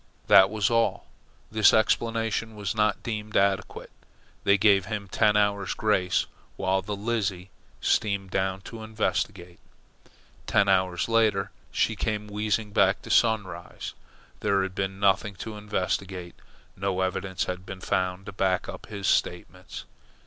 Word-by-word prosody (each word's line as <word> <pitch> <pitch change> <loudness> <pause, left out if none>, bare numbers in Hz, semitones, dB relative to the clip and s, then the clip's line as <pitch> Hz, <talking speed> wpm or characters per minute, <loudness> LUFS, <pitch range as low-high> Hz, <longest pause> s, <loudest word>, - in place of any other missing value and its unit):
That 95 0 +7
was 105 0 0
all. 115 0 +1 0.5
This 110 -1 +5
explanation 115 0 0
was 100 -4 -3
not 105 -1 +1
deemed 110 -2 -3
adequate. 100 0 0 0.5
They 100 0 +5
gave 100 -2 +4
him 100 0 -4
ten 105 +2 +3
hours' 100 -1 +1
grace 95 -4 +1 0.3
while 95 +1 0
the 105 +2 -4
Lizzie 100 -4 -2 0.3
steamed 100 -3 0
down 95 0 -1
to 110 +3 -9
investigate. 100 -5 -3 0.9
Ten 100 -2 +3
hours 95 -3 +2
later 110 -3 +2 0.2
she - - +1
came 105 -1 -2
wheezing 105 +1 -1
back - - +3
to - - -6
Sunrise. 100 -7 0 0.5
There 100 -1 +1
had 95 -1 -4
been 95 0 -3
nothing 100 +1 +2
to 110 +4 -7
investigate. 95 -3 -3 0.4
No 95 -1 -1
evidence 95 0 -1
had 90 0 -5
been 95 0 -8
found 95 0 -1
to 105 - -7
back 95 -1 0
up - - -8
his 100 -2 -6
statements. - - -1
100 Hz, 140 wpm, -26 LUFS, 95-110 Hz, 0.9 s, That